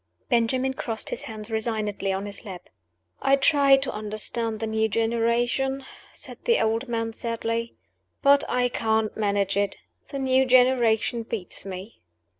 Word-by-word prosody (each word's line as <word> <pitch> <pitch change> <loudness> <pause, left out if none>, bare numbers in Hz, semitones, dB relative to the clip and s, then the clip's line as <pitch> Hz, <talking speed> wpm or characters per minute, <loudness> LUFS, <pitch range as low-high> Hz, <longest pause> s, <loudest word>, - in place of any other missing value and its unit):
Benjamin 255 +2 +2
crossed 225 -4 -2
his - - -4
hands 215 0 -8
resignedly 215 -3 -1
on 190 +1 -2
his 200 -1 -8
lap. 185 -4 -9 0.5
"I 275 - +4
try 275 0 +5
to 270 0 -2
understand 215 +1 -2
the 225 - -2
new 220 0 0
generation," 235 +4 0 0.3
said - - -8
the 470 -1 +4
old 225 +4 0
man, 230 -1 -2
sadly; 230 0 -3 0.5
"but 280 0 +6
I 245 0 +2
can't 220 -2 0
manage 200 -2 0
it. 200 -1 0 0.3
The 280 - -6
new 265 -1 +2
generation 245 -2 +4
beats 220 -6 -5
me." 190 +3 -8
230 Hz, 145 wpm, -25 LUFS, 215-255 Hz, 0.5 s, but